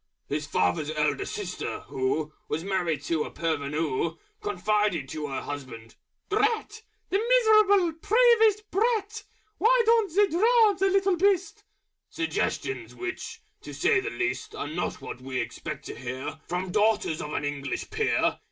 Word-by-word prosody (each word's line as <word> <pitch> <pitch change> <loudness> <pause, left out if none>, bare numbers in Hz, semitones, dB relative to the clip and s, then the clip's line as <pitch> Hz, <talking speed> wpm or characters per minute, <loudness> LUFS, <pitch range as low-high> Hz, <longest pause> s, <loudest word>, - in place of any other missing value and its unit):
His 150 +1 -3
father's 90 +5 +1
Elder 150 -2 0
Sister, 200 -4 -4
who 150 +4 -2 0.2
Was 160 +2 -2
married 180 -5 -1
to 165 -2 0
a - - -6
Parvenoo, 155 -1 -1 0.3
Confided 205 -5 0
to 155 -1 -4
Her 135 - -3
Husband, 130 -6 -8 0.3
"Drat! 430 +1 0 0.3
The 390 - +3
Miserable, 430 -6 +4
Peevish 450 -2 +5
Brat! 435 0 0 0.3
Why 485 +2 +5
don't 450 -6 +3
they 415 +1 +6
drown 425 +3 +4
the 390 +1 +3
Little 390 -1 +2
Beast?" 385 0 +1 0.5
Suggestions 345 +3 -2
which, 365 +1 -6 0.2
to - - -9
say - - +3
the 405 +2 -3
least, 365 -3 -3
Are - - -4
not - - -3
what 125 - -7
we 130 0 -3
expect 150 -3 -5
to - - -6
hear 135 +4 -6
From 180 +1 -3
Daughters 210 -6 +1
of 150 - -5
an 145 - -1
English 140 -1 -4
Peer. 445 0 +1
210 Hz, 145 wpm, -27 LUFS, -, 0.5 s, they